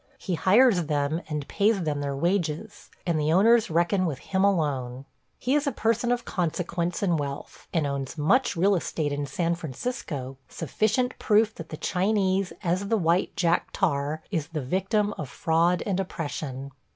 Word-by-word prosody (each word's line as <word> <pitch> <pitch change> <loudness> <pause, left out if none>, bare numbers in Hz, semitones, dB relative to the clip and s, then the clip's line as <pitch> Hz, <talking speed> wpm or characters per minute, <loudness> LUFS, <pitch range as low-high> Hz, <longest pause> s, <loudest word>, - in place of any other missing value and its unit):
He 190 - -4
hires 190 +1 +4
them 150 +2 0
and 150 -2 -3
pays 205 -2 +2
them 150 -2 -1
their 140 -1 -2
wages, 170 +4 -2 0.2
and 170 -3 +1
the 150 +1 +1
owners 220 +6 +5
reckon 175 +3 +2
with 145 -5 -3
him 190 +5 -1
alone. 140 -9 0 0.3
He 255 - -1
is 295 0 +2
a - - +2
person 230 +1 0
of 245 -1 -1
consequence 175 0 -2
and 175 -5 +2
wealth, 140 -1 -6
and 160 -3 +1
owns 140 +1 -3
much 240 - +2
real 195 +4 +3
estate 155 -4 -1
in 145 0 -2
San 170 +4 0
Francisco, 145 - -5
sufficient 215 - -1
proof 215 0 +3
that 165 -4 -9
the 155 - -6
Chinese, 190 0 +1
as 185 +3 0
the 225 - +2
white 175 0 +1
Jack 170 -1 +2
Tar, 150 -3 0
is 160 -6 -1
the 160 -2 -4
victim 195 - 0
of 150 -4 -4
fraud 165 +4 +1
and 195 -2 0
oppression. 140 -6 -4
170 Hz, 170 wpm, -26 LUFS, 150-200 Hz, 0.3 s, owners